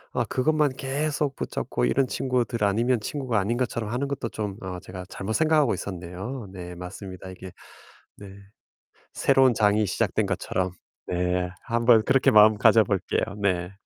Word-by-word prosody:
아 120 Hz, -, +1 dB
그것만 150 Hz, +4 st, +1 dB
계속 145 Hz, +1 st, -2 dB
붙잡고 -, -, -2 dB
이런 135 Hz, -, +2 dB
친구들 125 Hz, -3 st, -1 dB
아니면 115 Hz, +5 st, +2 dB
친구가 125 Hz, -1 st, -2 dB
아닌 110 Hz, +5 st, -1 dB
것처럼 115 Hz, -3 st, -2 dB
하는 130 Hz, +4 st, -1 dB
것도 140 Hz, -4 st, -3 dB
좀 105 Hz, -3 st, -5 dB
어 90 Hz, -1 st, -5 dB
제가 90 Hz, 0 st, -9 dB
잘못 105 Hz, +3 st, -4 dB
생각하고 155 Hz, -2 st, +3 dB
있었네요. 95 Hz, +6 st, -6 dB
네 90 Hz, -1 st, -8 dB
맞습니다. 95 Hz, +1 st, -8 dB
이게 95 Hz, 0 st, -10 dB, 0.7 s
네. 100 Hz, -, -11 dB, 0.9 s
새로운 130 Hz, -2 st, +4 dB
장이 105 Hz, 0 st, +3 dB
시작된 -, -, 0 dB
것처럼 95 Hz, 0 st, -2 dB, 0.4 s
네 90 Hz, 0 st, -1 dB
한번 115 Hz, -1 st, +4 dB
그렇게 135 Hz, 0 st, +4 dB
마음 110 Hz, 0 st, +7 dB
가져 110 Hz, +1 st, +6 dB
볼게요. 95 Hz, -1 st, -1 dB, 0.2 s
네. 90 Hz, -2 st, 0 dB
110 Hz, 330 characters per minute, -25 LUFS, 95-130 Hz, 0.9 s, 마음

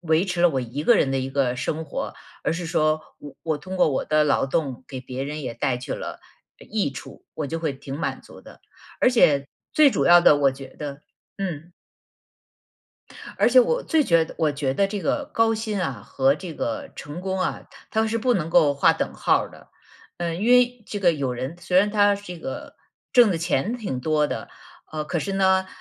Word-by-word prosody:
维 165 Hz, +1 st, +2 dB
持 180 Hz, -2 st, -2 dB
了 175 Hz, -, +6 dB
我 135 Hz, -4 st, -1 dB
一 125 Hz, +4 st, -5 dB
个 235 Hz, +8 st, +5 dB
人 135 Hz, -6 st, +2 dB
的 135 Hz, -, 0 dB
一 130 Hz, +1 st, -4 dB
个 135 Hz, -2 st, +1 dB
生 150 Hz, +5 st, -3 dB
活， 140 Hz, -, -5 dB, 0.3 s
而 -, -, 0 dB
是 170 Hz, +1 st, -4 dB
说 155 Hz, -1 st, +1 dB, 0.2 s
我 145 Hz, -, -11 dB
我 160 Hz, -2 st, 0 dB
通 185 Hz, +6 st, -7 dB
过 180 Hz, -, +4 dB
我 135 Hz, -, -1 dB
的 155 Hz, 0 st, +3 dB
劳 145 Hz, -, +2 dB
动 135 Hz, -2 st, -2 dB
给 130 Hz, -2 st, -6 dB
别 130 Hz, +1 st, -6 dB
人 150 Hz, +2 st, -5 dB
也 125 Hz, -3 st, -5 dB
带 125 Hz, 0 st, -1 dB
去 125 Hz, -, -5 dB
了， -, -, -6 dB, 0.4 s
呃， -, -, -15 dB
益 210 Hz, -9 st, 0 dB
处， 135 Hz, -, -11 dB
我 155 Hz, -, -3 dB
就 165 Hz, +3 st, -4 dB
会 155 Hz, -4 st, -1 dB
挺 135 Hz, +1 st, -7 dB
满 -, -, -2 dB
足 -, -, -15 dB
的。 -, -, -15 dB, 0.4 s
而 -, -, +5 dB
且 145 Hz, -, +4 dB, 0.3 s
最 300 Hz, -2 st, +6 dB
主 -, -, 0 dB
要 175 Hz, 0 st, +7 dB
的 150 Hz, -, +7 dB
我 140 Hz, -1 st, +4 dB
觉 135 Hz, 0 st, -10 dB
得 145 Hz, -1 st, -7 dB, 0.3 s
嗯。 175 Hz, -4 st, -5 dB, 1.7 s
而 -, -, +5 dB
且 -, -, +7 dB
我 485 Hz, 0 st, +1 dB
最 320 Hz, -2 st, +2 dB
觉 165 Hz, -5 st, +4 dB
得 -, -, -11 dB
我 155 Hz, -3 st, +2 dB
觉 140 Hz, -2 st, -2 dB
得 195 Hz, +6 st, +2 dB
这 205 Hz, 0 st, -4 dB
个 290 Hz, +8 st, -1 dB
高 225 Hz, 0 st, +3 dB
薪 215 Hz, -2 st, -3 dB
啊 130 Hz, -, -3 dB
和 135 Hz, +3 st, +2 dB
这 165 Hz, +1 st, -8 dB
个 115 Hz, -5 st, -4 dB
成 145 Hz, +4 st, -7 dB
功 190 Hz, 0 st, -2 dB
啊， -, -, -2 dB, 0.3 s
它 220 Hz, 0 st, +1 dB
是 225 Hz, +1 st, -1 dB
不 245 Hz, +2 st, +2 dB
能 165 Hz, -4 st, -2 dB
够 145 Hz, -3 st, +4 dB
画 140 Hz, -, +4 dB
等 -, -, -3 dB
号 -, -, +2 dB
儿 -, -, -12 dB
的。 -, -, -16 dB, 0.5 s
呃， 170 Hz, -1 st, -2 dB
因 210 Hz, +7 st, 0 dB
为 250 Hz, -1 st, +4 dB
这 205 Hz, -, -4 dB
个 175 Hz, -4 st, +4 dB
有 140 Hz, -4 st, -2 dB
人， 130 Hz, +6 st, -5 dB
虽 180 Hz, +2 st, +2 dB
然 205 Hz, +2 st, +3 dB
他 205 Hz, -1 st, +4 dB
这 200 Hz, -3 st, -8 dB
个 265 Hz, -, -7 dB, 0.4 s
挣 240 Hz, -4 st, +6 dB
的 175 Hz, -, 0 dB
钱 170 Hz, -, 0 dB
挺 195 Hz, -, -4 dB
多 150 Hz, +1 st, +1 dB
的， 110 Hz, -7 st, -5 dB, 0.4 s
呃， 155 Hz, -1 st, -3 dB
可 170 Hz, -, -2 dB
是 195 Hz, +5 st, -3 dB
呢， 190 Hz, -1 st, +3 dB
160 Hz, 235 characters per minute, -24 LUFS, 140-195 Hz, 1.7 s, 要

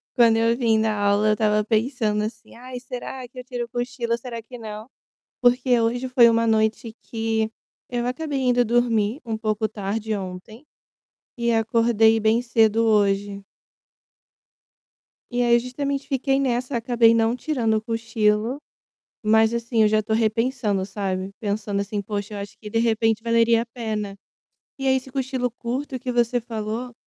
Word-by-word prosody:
quando 230 Hz, -2 st, +5 dB
eu 230 Hz, +1 st, +3 dB
vim 225 Hz, -3 st, +2 dB
da 220 Hz, -1 st, +1 dB
aula 205 Hz, +1 st, +2 dB
eu 215 Hz, -, +3 dB
tava 210 Hz, 0 st, +2 dB
pensando, 220 Hz, -1 st, 0 dB
assim: 215 Hz, +2 st, -7 dB
"Ai, 250 Hz, +1 st, -8 dB
será 250 Hz, +1 st, -7 dB
que 250 Hz, -, -21 dB
eu -, -, -7 dB
tiro 245 Hz, -1 st, -4 dB
o -, -, -18 dB
cochilo, 240 Hz, -1 st, -2 dB
será 235 Hz, -1 st, -7 dB
que 245 Hz, +3 st, -11 dB
não?", 215 Hz, +1 st, -8 dB, 0.5 s
porque 245 Hz, 0 st, +3 dB
hoje 245 Hz, +3 st, 0 dB
foi 250 Hz, -2 st, +6 dB
uma 230 Hz, 0 st, +2 dB
noite 220 Hz, 0 st, 0 dB
que 225 Hz, -1 st, -2 dB, 0.4 s
eu 240 Hz, -1 st, -2 dB
acabei 285 Hz, +2 st, -2 dB
indo 245 Hz, -1 st, +3 dB
dormir 235 Hz, 0 st, +1 dB
um 225 Hz, -1 st, -2 dB
pouco 220 Hz, 0 st, -1 dB
tarde 215 Hz, +1 st, -3 dB
ontem 195 Hz, +7 st, -8 dB, 0.7 s
e 235 Hz, -1 st, 0 dB
acordei 225 Hz, 0 st, +3 dB
bem 220 Hz, +2 st, +3 dB
cedo 225 Hz, -2 st, +2 dB
hoje. 200 Hz, -2 st, +1 dB, 1.9 s
E 245 Hz, 0 st, 0 dB
aí, 235 Hz, -1 st, +5 dB
justamente 275 Hz, +3 st, -3 dB
fiquei 270 Hz, 0 st, +1 dB
nessa, 250 Hz, -1 st, -1 dB
acabei 235 Hz, -1 st, +4 dB
não 230 Hz, +1 st, +2 dB
tirando 250 Hz, -5 st, -1 dB
o 215 Hz, -, -2 dB
cochilo, 225 Hz, +1 st, 0 dB, 0.7 s
mas 220 Hz, +1 st, +4 dB
assim, 235 Hz, -1 st, +1 dB
eu 215 Hz, -, +5 dB
já 215 Hz, 0 st, +3 dB
tô 220 Hz, -, -4 dB
repensando, 220 Hz, -2 st, 0 dB
sabe, 190 Hz, -1 st, -3 dB
pensando 205 Hz, -1 st, -2 dB
assim: 205 Hz, +1 st, -3 dB
"Poxa, 205 Hz, +1 st, -5 dB
eu -, -, -5 dB
acho 200 Hz, 0 st, -8 dB
que 210 Hz, -2 st, -9 dB
de 225 Hz, -, 0 dB
repente 225 Hz, -1 st, +1 dB
valeria 230 Hz, 0 st, +3 dB
a -, -, -8 dB
pena". 215 Hz, -4 st, -4 dB, 0.6 s
E 270 Hz, -, -3 dB
aí 265 Hz, 0 st, +4 dB
esse 265 Hz, 0 st, -5 dB
cochilo 260 Hz, -1 st, -2 dB
curto 255 Hz, +3 st, -4 dB
que 250 Hz, 0 st, -4 dB
você 240 Hz, 0 st, +1 dB
falou, 225 Hz, +2 st, -5 dB
230 Hz, 165 wpm, -23 LUFS, 215-245 Hz, 1.9 s, foi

